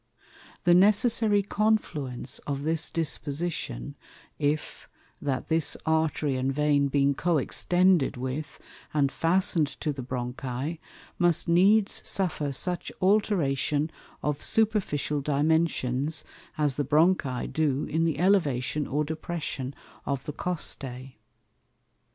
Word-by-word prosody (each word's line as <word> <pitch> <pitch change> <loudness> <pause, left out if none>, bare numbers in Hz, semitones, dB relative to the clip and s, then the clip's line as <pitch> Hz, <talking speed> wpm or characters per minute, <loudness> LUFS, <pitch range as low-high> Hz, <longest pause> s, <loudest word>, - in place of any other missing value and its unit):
The 175 - +5
necessary 205 +2 +4
confluence 155 - -1
of 140 -1 -3
this 160 +1 0
Disposition 150 - -3 0.5
if, 145 +1 -2 0.3
that 135 -3 -2
this 160 -2 +2
Artery 160 -3 +1
and 130 +1 0
Vein 145 0 +2
being 140 0 +2
co 170 +3 +1
extended 175 +1 +2
with, 130 +4 -5 0.4
and 140 -2 +2
fasten'd 170 -2 +2
to 150 - -1
the 135 - -6
Bronchi, 130 +4 -4 0.4
must 175 -3 +2
needs 195 +5 +4
suffer 160 -7 0
such 175 +6 -2
alteration 160 -7 +1 0.3
of 150 -1 -1
Superficial 200 -10 +1
Dimensions, 150 -1 0 0.3
as 145 -4 +1
the 145 - +1
Bronchi 150 -2 +2
do 150 -3 +1
in 160 +2 -1
the 160 -4 0
Elevation 150 -7 +1
or 150 +3 0
Depression 155 -4 -4 0.4
of 140 -2 -2
the 150 - -5
Costæ. 135 -7 -4
150 Hz, 110 wpm, -27 LUFS, 140-175 Hz, 0.5 s, The